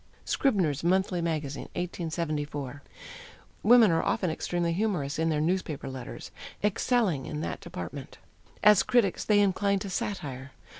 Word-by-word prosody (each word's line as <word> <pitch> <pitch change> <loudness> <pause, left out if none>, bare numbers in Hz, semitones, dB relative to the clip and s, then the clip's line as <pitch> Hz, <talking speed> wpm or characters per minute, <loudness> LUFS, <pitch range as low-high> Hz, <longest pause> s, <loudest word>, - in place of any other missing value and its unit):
Scribner's 180 - +1
Monthly 185 0 +2
Magazine, 155 -4 -3
1874. 150 -5 -3 0.8
Women 225 -2 +7
are 165 - +2
often 195 -6 0
extremely 170 +1 -1
humorous 165 -8 -1
in 165 0 +2
their 155 -2 +1
newspaper 165 -2 -1
letters, 130 -2 -7 0.3
excelling 210 - +1
in 155 -1 -4
that - - -4
department. - - -7 0.5
As 210 -2 +7
critics 230 -7 +2
they 210 -1 +4
incline 200 0 +2
to 195 0 -5
satire. 140 -9 -4
170 Hz, 130 wpm, -28 LUFS, 150-200 Hz, 0.8 s, Women